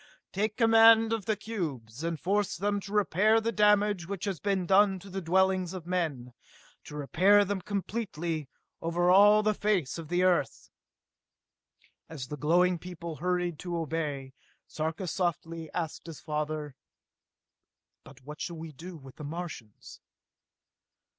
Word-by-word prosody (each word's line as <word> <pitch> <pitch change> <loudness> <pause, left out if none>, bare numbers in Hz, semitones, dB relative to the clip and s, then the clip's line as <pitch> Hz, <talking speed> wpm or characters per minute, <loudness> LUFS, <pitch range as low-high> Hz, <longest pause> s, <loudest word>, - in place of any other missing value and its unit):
"Take 210 +2 -1
command 225 -1 +6
of 220 -4 -3
the 215 - +1
cubes, 155 - -5
and 165 -2 -2
force 200 +2 0
them 205 +2 0
to 200 0 -10
repair 210 +2 +3
the 225 +1 -1
damage 210 -4 +3
which 195 -2 -4
has 195 -6 -3
been 190 +2 0
done 195 +1 +4
to 195 +1 -12
the 195 +1 -4
dwellings 185 +1 +1
of 180 -3 -7
men 155 -9 -2 0.5
to 150 - -9
repair 185 +8 +4
them 200 -1 -2
completely, 175 - -3 0.3
over 175 +2 +1
all 205 +3 +7
the 215 0 +2
face 195 -8 0
of 165 - -8
the 175 +3 +1
Earth!" 185 -2 0 1.4
As 135 -6 -7
the 150 - -4
glowing 175 +5 +2
people 170 -2 -7
hurried 180 -1 -1
to 175 -1 -4
obey, 150 -4 -3 0.3
Sarka 160 +4 -4
softly 165 -2 -3
asked 165 -1 -4
his 165 -3 -8
father: 150 -2 -4 1.3
"But - - -15
what 150 +4 -10
shall 170 -2 -4
we 160 0 -7
do 170 +4 -10
with 135 -3 -14
the 150 - -8
Martians?" 150 - -8
175 Hz, 145 wpm, -29 LUFS, 160-200 Hz, 1.4 s, all